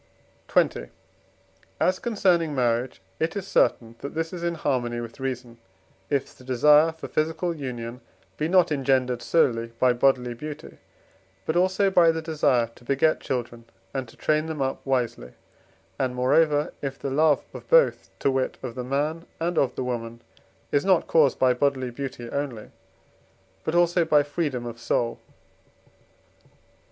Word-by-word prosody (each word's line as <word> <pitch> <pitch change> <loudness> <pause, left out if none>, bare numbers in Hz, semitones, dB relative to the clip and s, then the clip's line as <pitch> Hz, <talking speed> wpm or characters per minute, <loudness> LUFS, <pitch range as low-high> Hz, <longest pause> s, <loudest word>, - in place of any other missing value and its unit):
XX. - - +1 0.9
As 185 0 +2
concerning 180 - +1
marriage, 120 -3 0 0.2
it 160 +4 -1
is 200 -2 -3
certain 115 -10 +2
that 140 - -7
this 165 +1 -2
is 175 - -6
in 170 0 -1
harmony 125 -6 -1
with 115 +2 -8
reason, 125 -3 -5 0.5
if 140 -2 -1
the - - -16
desire 150 +5 +5
for 160 0 -9
physical 160 +2 -1
union 125 -4 -6 0.3
be 155 - -1
not 180 -1 +4
engendered 130 -3 +1
solely 115 -8 +1
by 125 +1 +4
bodily 125 -1 +2
beauty, 150 +5 -9 0.7
but 160 - -1
also 185 +2 +2
by 175 -3 +6
the 160 0 +1
desire 150 -7 +1
to - - -19
beget 140 +5 +2
children 120 -2 -4 0.3
and 130 -2 -3
to 115 - -17
train 155 +1 +1
them 160 -2 -5
up 135 -1 -2
wisely; 120 - -1 0.7
and 130 -2 -1
moreover, 145 +4 +2
if 135 -1 -4
the 140 - -4
love 150 +1 +3
of - - -10
both, - - +4
to 140 - +1
wit, 130 -1 -1
of 125 -3 -4
the 125 - -5
man 150 +6 -2
and 170 +2 -1
of 130 -5 +1
the - - -2
woman, 115 -2 -5 0.5
is 145 - +2
not 190 -3 +3
caused 150 -5 +3
by 130 -1 +4
bodily 130 -1 0
beauty 125 -2 -6
only, 135 -6 -4 0.9
but 160 - -2
also 175 0 +4
by 150 -3 +4
freedom 145 -5 -3
of 120 -1 -7
soul. 115 0 -1
140 Hz, 155 wpm, -25 LUFS, 125-160 Hz, 0.9 s, by